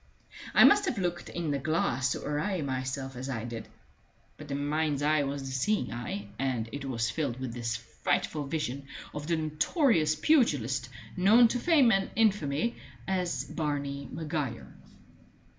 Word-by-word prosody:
I - - +9
must 410 0 +7
have 235 - -1
looked 175 -2 -2
in 170 -3 -2
the 140 - 0
glass 135 -3 +1
to - - -6
array 150 +4 -1
myself 130 0 -3
as 130 +2 -5
I 115 -4 -3
did; 115 -2 -6 0.7
but 150 - -11
the 140 - -3
mind's 145 0 0
eye 155 0 +3
was 140 0 -3
the 135 - -5
seeing 130 - 0
eye, 110 -4 -5
and 130 -4 -1
it 140 -1 -5
was 115 -4 -1
filled 140 -6 -2
with 130 -3 -4
this 115 -1 -2
frightful 140 +5 -2
vision 140 -2 -3 0.3
of 150 0 -5
the 170 - +2
notorious 155 - +2
pugilist 135 - +2 0.3
known 215 +6 +6
to 245 - -1
fame 285 -5 +5
and 195 -1 +2
infamy 205 -3 +1 0.3
as 185 -2 -1
Barney 140 -3 -3
Maguire. 150 -7 -4
145 Hz, 160 wpm, -29 LUFS, 130-175 Hz, 0.7 s, I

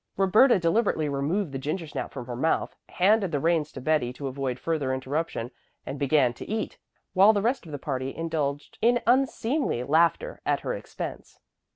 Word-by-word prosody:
Roberta 210 +7 +5
deliberately 170 -2 +1
removed 145 +6 -1
the 135 - -4
gingersnap 150 +3 -4
from 125 -3 -7
her 120 0 -5
mouth, 160 +7 0
handed 195 0 +3
the 145 - 0
reins 160 -1 +1
to - - -7
Betty 130 -2 +1
to 140 - -7
avoid 135 -1 -3
further 145 -5 -1
interruption, 130 -2 -3 0.3
and 140 - -5
began 140 -3 +3
to - - -10
eat, 220 +1 -3 0.3
while 200 +3 +7
the 205 - +1
rest 240 -5 0
of - - -9
the 145 - -4
party 135 -1 -4
indulged 150 -3 -3
in 240 +1 +3
unseemly 255 - +1
laughter 170 - +2
at - - 0
her - - -2
expense. - - -7
155 Hz, 175 wpm, -26 LUFS, 135-200 Hz, 0.3 s, while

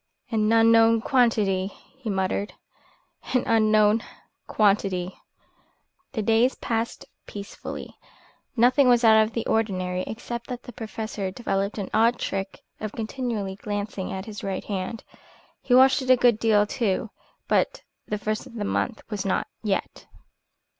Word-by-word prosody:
"An 215 -1 +2
unknown 225 0 +5
quantity!" 215 -7 +2 0.3
he 265 -4 -7
muttered. 195 +1 -1 0.8
"An 250 - +3
unknown 215 -1 +3 0.4
quantity!" 195 -3 +1 1.0
The 220 -5 -2
days 230 +4 +3
passed 230 0 -3 0.2
peacefully. 200 -1 -8 0.6
Nothing 250 +3 +5
was 240 -1 +4
out 220 -1 +7
of 220 +1 0
the 230 - -2
ordinary 185 -5 0
except 235 +1 -6
that 245 -1 -6
the 245 - -10
Professor 215 -3 -5
developed 195 0 -2
an 200 -3 -4
odd 230 +2 +4
trick 195 0 -4 0.2
of 215 -1 -5
continually 220 -4 -3
glancing 205 -2 -4
at 190 +1 -5
his 210 -2 -8
right 195 -1 -3
hand. 200 +2 -4 0.6
He 250 - +2
washed 265 +2 +6
it 260 - -5
a 255 - +7
good 240 -3 +4
deal, 210 -2 +4
too. 210 -1 -1 0.4
But - - +1 0.2
the 210 - -2
first 215 +1 -3
of - - -14
the 210 -2 -3
month 220 +2 -2
was 210 -3 -4
not 195 - 0 0.2
yet. 205 -3 -3
220 Hz, 140 wpm, -25 LUFS, 200-230 Hz, 1.0 s, out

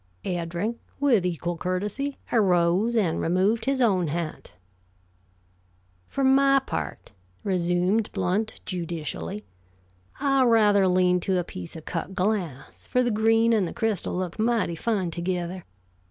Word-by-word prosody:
Eddring, 175 +6 -2 0.2
with 240 -10 +3
equal 175 0 -3
courtesy, 205 +11 -2
arose 190 +1 +3
and 180 -8 +1
removed 190 +7 +1
his 270 0 0
own 190 -8 +3
hat. 160 +1 -4 1.5
"For 275 - -2
my 275 +1 +5
part," 270 - -4 0.3
resumed 180 +3 +1
Blount, 195 +3 -1
judicially, 155 - -4 0.7
"I 275 -1 +3
rather 210 -4 +4
lean 180 0 +3
to 185 +1 0
a 180 - 0
piece 90 - -8
of 160 - -9
cut 175 +2 -4
glass, 180 -8 -2
for 250 - +2
the 240 - +1
green 225 +2 +3
and 205 -5 +2
the - - -6
crystal 220 -5 -1
look 180 +1 -4
mighty 225 -6 +1
fine 190 -2 -1
together. 175 +1 -3
190 Hz, 130 wpm, -25 LUFS, 175-225 Hz, 1.5 s, my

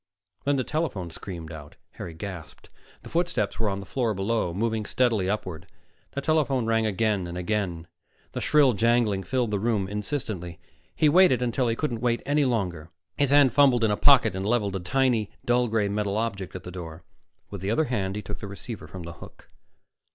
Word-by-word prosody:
Then 145 0 +3
the 130 - 0
telephone 125 - -2
screamed 85 -2 -7
out 75 -2 -10 0.2
Harry 85 -2 -8
gasped. 85 -4 -8 0.3
The - - -10
footsteps 165 - -1
were 110 -2 +1
on 100 0 -2
the - - -9
floor 115 -1 -1
below, 95 -1 0
moving 110 +4 -1
steadily 110 -4 +1
upward. 90 -6 -4 0.5
The 140 - -2
telephone 140 -5 +1
rang 115 -1 +2
again 105 -3 0
and 85 +1 -6
again; 90 -3 -2 0.5
the - - -4
shrill 145 -4 +4
jangling 115 -2 +2
filled 120 +3 -1
the 100 - 0
room 105 -3 0
insistently. 105 - -4 0.4
He 155 - +3
waited 150 -6 +5
until 125 +1 0
he 115 - +1
couldn't 120 -4 -2
wait 120 -1 0
any 145 0 +2
longer. 90 -10 -1 0.3
His 145 -2 +2
hand 145 -3 +5
fumbled 130 -4 +5
in 110 - +3
a - - +2
pocket 120 -5 +5
and 95 - -3
leveled 105 -2 +1
a - - -1
tiny, 115 +2 +1 0.2
dull 120 0 +3
gray 110 -2 +1
metal 100 0 -1
object 100 -5 -3
at 95 - -6
the 90 - -7
door. 85 -2 -8 0.5
With 100 -3 -6
the 95 - -2
other 115 +9 +2
hand, 100 -8 -2
he 105 - -4
took 105 - -6
the 105 - -6
receiver 100 +3 -8
from 95 -2 -8
the 85 0 -7
hook. - - -14
110 Hz, 195 wpm, -26 LUFS, 95-125 Hz, 0.5 s, waited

